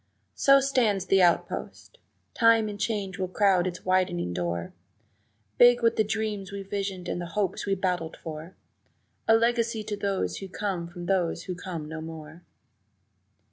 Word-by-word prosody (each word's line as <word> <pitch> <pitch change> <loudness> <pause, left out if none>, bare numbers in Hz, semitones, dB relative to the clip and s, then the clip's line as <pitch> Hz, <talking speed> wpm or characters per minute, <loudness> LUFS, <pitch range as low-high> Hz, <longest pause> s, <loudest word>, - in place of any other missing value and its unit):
So 275 0 +5
stands 235 -8 +1
the 195 0 +4
outpost! 175 -2 0 0.3
Time 230 -2 +4
and 205 -1 -6
change 200 -4 -2
will 185 - -1
crowd 185 -1 +2
its 180 0 -6
widening 185 - +1
door, 85 -1 -3 0.9
Big 245 0 +7
with 230 0 +4
the 220 - +3
dreams 210 -2 -3
we 200 0 -5
visioned 195 -2 -4
and 175 - -3
the 175 - -5
hopes 205 0 -1
we 195 - +2
battled 180 -4 -2
for 160 +2 -8 0.7
A 225 - +6
legacy 230 -1 +1
to 210 0 -4
those 200 -1 -2
who 195 - -7
come 185 -3 -3
from 175 0 -8
those 175 -3 0
who 185 - -4
come 175 -4 -6
no 160 0 -6
more. 160 +1 -9
190 Hz, 160 wpm, -27 LUFS, 175-215 Hz, 0.9 s, Big